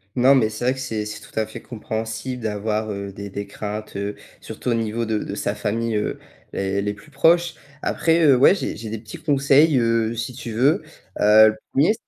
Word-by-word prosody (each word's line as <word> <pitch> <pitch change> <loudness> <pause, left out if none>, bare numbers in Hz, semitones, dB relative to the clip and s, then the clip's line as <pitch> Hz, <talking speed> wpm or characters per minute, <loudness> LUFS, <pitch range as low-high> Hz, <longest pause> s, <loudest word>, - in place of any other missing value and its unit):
Non, 130 +2 +5
mais 115 -5 +3
c'est 110 +2 -5
vrai 130 - +3
que 135 - -8
c'est 110 -5 -3
c'est 105 0 -7
tout - - -16
à 110 - +1
fait 110 - -10
compréhensible 110 +2 -5
d'avoir 110 0 -2
heu, 100 -1 -5
des 100 +1 -7
des 100 +1 -5
craintes 105 +1 -6
heu, 100 +1 -3 0.3
surtout - - -5
au - - +3
niveau 115 0 -1
de 110 -1 -1
de - - -5
sa - - -2
famille 115 +2 -2
heu, 105 - -1 0.3
les 95 0 -1
les 105 +1 -2
plus 155 - -17
proches. 165 +4 +3 0.3
Après 165 0 +2
heu, 140 -3 +7
ouais 135 +9 +6
j'ai - - -3
j'ai 110 +1 -7
des 110 - -4
petits 110 0 -10
conseils, 140 0 +4
heu, 115 -1 +1
si 120 +3 -4
tu 130 -1 -7
veux, 135 - +3 0.4
heu, 110 +1 +8
le 110 - -4 0.2
1er 150 +10 +3
110 Hz, 220 wpm, -22 LUFS, 105-130 Hz, 0.4 s, heu